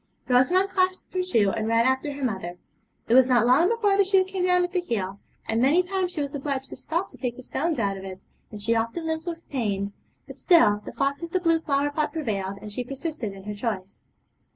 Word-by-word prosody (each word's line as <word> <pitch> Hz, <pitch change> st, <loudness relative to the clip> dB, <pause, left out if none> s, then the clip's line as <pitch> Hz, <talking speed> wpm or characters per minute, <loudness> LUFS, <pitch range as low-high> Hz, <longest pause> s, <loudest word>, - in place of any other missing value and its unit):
Rosamond 345 Hz, +11 st, +3 dB
clasped 370 Hz, -1 st, 0 dB
her 370 Hz, -, +1 dB
shoe 225 Hz, -, +2 dB
and 220 Hz, 0 st, -2 dB
ran 230 Hz, +1 st, +3 dB
after 265 Hz, +3 st, +1 dB
her 280 Hz, 0 st, -6 dB
mother. 190 Hz, -7 st, -3 dB, 0.5 s
It -, -, +2 dB
was 255 Hz, 0 st, +7 dB
not 245 Hz, -2 st, +4 dB
long 275 Hz, +9 st, +5 dB
before 425 Hz, -4 st, +2 dB
the 400 Hz, -, +6 dB
shoe 385 Hz, 0 st, +4 dB
came 375 Hz, -1 st, -2 dB
down 360 Hz, 0 st, +4 dB
at 355 Hz, -, -2 dB
the 365 Hz, -, +1 dB
heel, 200 Hz, -, -3 dB, 0.3 s
and 225 Hz, +1 st, +1 dB
many 300 Hz, +8 st, +4 dB
times 370 Hz, 0 st, -1 dB
she 310 Hz, -, -3 dB
was 280 Hz, -1 st, -3 dB
obliged 270 Hz, -2 st, -3 dB
to -, -, -6 dB
stop 340 Hz, +4 st, -3 dB
to -, -, -15 dB
take 245 Hz, -3 st, -3 dB
the 255 Hz, -, -11 dB
stones 320 Hz, +4 st, -1 dB
out 200 Hz, -4 st, 0 dB
of 190 Hz, -, -9 dB
it, 190 Hz, -1 st, -8 dB, 0.3 s
and 210 Hz, -, -9 dB
she 220 Hz, +3 st, +1 dB
often 230 Hz, +9 st, -1 dB
limped 320 Hz, +1 st, -3 dB
with 335 Hz, 0 st, -6 dB
pain; 205 Hz, -6 st, -2 dB, 0.3 s
but -, -, -12 dB
still 210 Hz, -, +5 dB
the -, -, -6 dB
thoughts 275 Hz, +2 st, -1 dB
of 335 Hz, -, -5 dB
the 370 Hz, -, 0 dB
blue 330 Hz, -2 st, +2 dB
flower 290 Hz, -2 st, 0 dB
pot 305 Hz, +1 st, -1 dB
prevailed, 200 Hz, -11 st, -3 dB
and 210 Hz, -, -7 dB
she 250 Hz, +4 st, -3 dB
persisted 275 Hz, -3 st, -5 dB
in 195 Hz, 0 st, -11 dB
her 210 Hz, +1 st, -5 dB
choice. 205 Hz, -3 st, -5 dB
275 Hz, 240 wpm, -25 LUFS, 220-345 Hz, 0.5 s, was